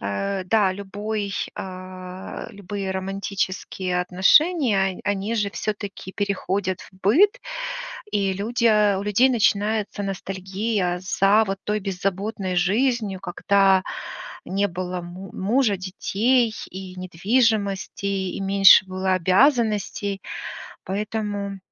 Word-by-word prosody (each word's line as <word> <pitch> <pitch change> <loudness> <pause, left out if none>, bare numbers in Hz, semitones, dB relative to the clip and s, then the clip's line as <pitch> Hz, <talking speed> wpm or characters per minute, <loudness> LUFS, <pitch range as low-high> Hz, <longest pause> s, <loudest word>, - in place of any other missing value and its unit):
э, 185 - -2
да, 200 0 +3
любой, 200 +1 -4 0.2
а, 185 0 -7
любые 200 0 -5
романтические 190 -1 -2
отношения, 195 - +3
он - - -10
они 205 +2 -1
же 210 -2 +1
всё-таки 205 -3 -5
переходят 200 -2 -1
в - - -15
быт. 400 - +4 0.7
И 195 -1 +1
люди, 230 +5 -2
э, 210 -3 +4
у - - -3
людей 210 +6 +4
начинается 215 -2 +1
ностальгия 195 0 -2
за 195 +3 +3
вот 195 0 -3
той 210 0 0
беззаботной 195 0 -2
жизнью, 210 +1 +1
когда 195 +1 +3 0.6
не 200 +2 +1
было 180 0 -4
му 180 +2 -9
мужа, 210 +1 +1
детей 220 +6 +1 0.2
и 185 0 -8
недвижимости, 200 +2 0
и 195 -2 -2
меньше 195 -1 +7
было 185 0 -1
обязанностей. 205 - +2 0.6
Поэтому, 205 0 -3
195 Hz, 110 wpm, -23 LUFS, 185-210 Hz, 0.7 s, меньше